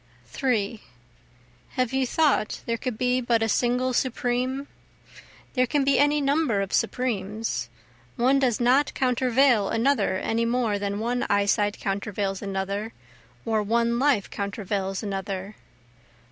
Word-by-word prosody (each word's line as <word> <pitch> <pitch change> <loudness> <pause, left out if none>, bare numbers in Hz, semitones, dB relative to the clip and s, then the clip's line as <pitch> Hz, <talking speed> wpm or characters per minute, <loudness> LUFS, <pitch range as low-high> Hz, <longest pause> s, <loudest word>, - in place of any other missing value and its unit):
3 220 - -1 0.9
Have 255 -1 -1
you 265 -1 +1
thought 290 -7 +1
there 230 - 0
could 240 -1 -4
be 250 +1 +1
but 235 -2 +1
a - - +1
single 250 +3 +1
supreme? 255 +2 -1 0.9
There 255 -1 +2
can 290 +2 +1
be 275 0 +3
any 290 +1 +4
number 280 -6 +1
of 195 0 -4
supremes 210 - -1 0.5
one 260 +3 +3
does 250 -5 +1
not 255 +4 +3
countervail 250 -3 +3
another 235 -4 +1
any 225 +4 -1
more 230 -3 0
than 200 0 -2
one 240 +2 -1
eyesight 205 +1 +2
countervails 195 -1 -2
another, 200 +2 -3 0.5
or 220 -1 +1
one 235 +2 +1
life 265 -7 +2
countervails 200 -1 -3
another. 195 0 -4
230 Hz, 130 wpm, -25 LUFS, 205-255 Hz, 0.9 s, any